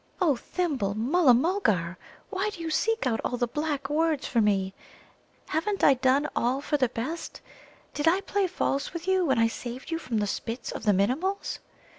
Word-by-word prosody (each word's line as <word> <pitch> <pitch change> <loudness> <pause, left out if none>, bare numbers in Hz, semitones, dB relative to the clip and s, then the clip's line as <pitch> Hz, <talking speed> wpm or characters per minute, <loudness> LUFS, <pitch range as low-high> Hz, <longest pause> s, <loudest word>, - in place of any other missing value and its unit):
"O 330 -7 +3
Thimble, 255 - -2
Mulla 260 +4 +4
mulgar, 230 - +1 0.4
why 385 +2 0
do 410 - -10
you 330 -1 -3
seek 450 +3 +1
out 225 -3 +1
all 245 - -1
the 245 - +1
black 290 +2 -2
words 310 0 +1
for 235 - +2
me? 195 -2 +1 0.8
Haven't 390 +6 -1
I 275 - +8
done 265 +3 +2
all 250 +3 +1
for 295 +1 -1
the 260 -4 +2
best? 265 +9 -5 0.5
Did 295 +2 -1
I 365 +4 +4
play 395 -1 0
false 280 -5 -1
with 340 +1 -6
you 375 -1 +3
when 265 - +2
I 230 0 +4
saved 245 +5 -7
you 330 - -1
from 250 -8 -3
the 210 - +1
spits 230 +4 -4
of - - -6
the 210 - +5
Minimuls? 275 - 0
280 Hz, 190 wpm, -27 LUFS, 235-340 Hz, 0.8 s, I